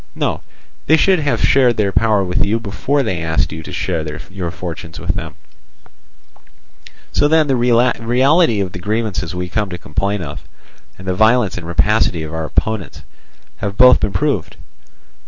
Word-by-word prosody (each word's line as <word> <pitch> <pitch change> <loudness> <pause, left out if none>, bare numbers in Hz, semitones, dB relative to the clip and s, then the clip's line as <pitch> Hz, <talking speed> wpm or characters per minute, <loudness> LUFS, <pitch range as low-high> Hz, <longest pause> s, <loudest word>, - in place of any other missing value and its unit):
No, - - -2 0.5
they 160 - +5
should 190 +1 +3
have 145 -2 -1
shared 125 -4 +3
their 100 -2 +1
power 105 -1 +2
with 90 -1 0
you 110 +3 0
before 130 +6 -1
they 95 -8 -2
asked 80 0 0
you 80 +1 -6
to - - -9
share 80 - -2 0.3
your 95 -3 -4
fortunes 80 -3 -7
with 90 +1 -2
them. 85 -4 -6 1.8
"So 145 - +2
then 160 0 +4
the 135 -2 +1
reality 120 - +3
of 95 -2 -3
the 90 - -7
grievances 105 -3 -2
we 90 0 -3
come 105 +2 -2
to 90 - -5
complain 95 +4 -2
of, 75 -1 -7 0.6
and 95 - -12
the 95 - +1
violence 110 +1 +3
and 85 -2 -7
rapacity 85 0 +1
of 80 0 -7
our 80 0 -3
opponents, 110 +3 -2 0.5
have 100 +9 -4
both 125 0 +7
been 105 - -1
proved. 95 - -1
100 Hz, 170 wpm, -17 LUFS, 90-120 Hz, 1.8 s, both